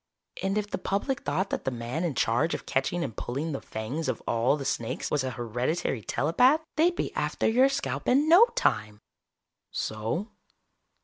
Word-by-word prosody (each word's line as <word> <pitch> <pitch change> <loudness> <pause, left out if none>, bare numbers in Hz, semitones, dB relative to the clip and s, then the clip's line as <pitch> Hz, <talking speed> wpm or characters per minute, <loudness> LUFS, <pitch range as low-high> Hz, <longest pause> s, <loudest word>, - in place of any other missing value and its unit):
And 195 +2 0
if 210 -1 -1
the 205 - -4
public 200 +9 -1
thought 190 +2 -1
that - - -2
the - - 0
man 120 +6 -4
in 165 -6 -1
charge 120 +8 +1
of - - -7
catching 165 +6 0
and 115 -8 -5
pulling 140 +6 -3
the 140 - -4
fangs 125 +9 -4
of - - -2
all 115 +5 +2
the 140 - -6
snakes 115 -3 -2
was 145 -3 +1
a 130 - -1
hereditary 120 +3 -2
telepath, 245 - +3
they'd 345 +3 +3
be - - -2
after - - 0
your 255 +4 +5
scalp 275 - -3
in 280 +4 +4
no 360 +9 +8
time." 105 - 0 0.7
"So?" 115 - -3
155 Hz, 180 wpm, -28 LUFS, -, 0.7 s, no